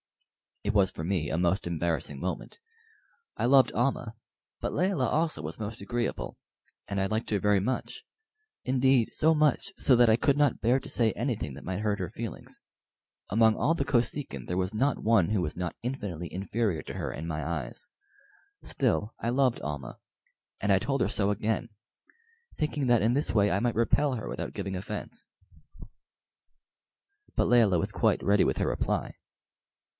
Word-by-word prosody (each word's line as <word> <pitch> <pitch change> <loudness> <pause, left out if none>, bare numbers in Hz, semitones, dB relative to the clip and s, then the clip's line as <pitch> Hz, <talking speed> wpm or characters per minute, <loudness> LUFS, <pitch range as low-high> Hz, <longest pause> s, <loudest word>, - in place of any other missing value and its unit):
It 105 - 0
was 100 -3 +4
for 80 - -6
me 85 -4 -1
a 80 - -1
most 90 +3 +1
embarrassing 80 -4 -2
moment. 90 - -5 0.8
I - - 0
loved 130 -1 +5
Almah, 120 -2 -1 0.4
but - - -3
Layelah 180 -9 +1
also 155 - 0
was 80 +6 -6
most 110 +1 -5
agreeable, 120 -1 -3 0.5
and 100 - -2
I - - +1
liked 110 +3 -2
her 105 - +2
very 105 0 +3
much; 120 +7 -3 0.6
indeed, 130 -2 +3
so 160 +1 +3
much 155 +6 +2
so 130 - +5
that 120 -1 +5
I 110 - +6
could 140 +3 +2
not 145 -4 +2
bear 125 +4 +3
to 140 - -11
say 115 -4 +2
anything 110 - -2
that - - -10
might 95 +1 -3
hurt 105 -1 0
her 90 -3 -3
feelings. 115 -6 -7 0.7
Among 110 +1 +4
all 165 - +2
the - - -1
Kosekin 120 - -1
there 90 - -2
was 95 +2 -1
not 135 +6 +1
one 110 -5 +4
who 105 -3 +1
was 75 -3 -3
not 90 -1 -3
infinitely 100 -10 -4
inferior 100 -1 -1
to - - -7
her - - -3
in 80 +3 -6
my 80 -2 -3
eyes. 80 -7 -4 0.7
Still, 115 -4 0
I 115 - -1
loved 130 -1 +2
Almah, 75 -5 -5 0.6
and 100 - +1
I 95 - +5
told 135 +7 -1
her - - +3
so 100 -1 0
again, 110 +3 -1 0.9
thinking 150 -2 -1
that 120 -3 +4
in 115 +2 +3
this 145 +3 +1
way 105 -2 +3
I 100 - +2
might 120 +1 0
repel 130 +5 +2
her 110 - -5
without - - -5
giving 95 -1 -4
offence. 95 +1 -6 2.1
But - - +2
Layelah 110 -8 +4
was - - -2
quite - - +1
ready 100 0 +4
with - - 0
her - - 0
reply. - - -1
110 Hz, 175 wpm, -28 LUFS, 95-125 Hz, 2.1 s, I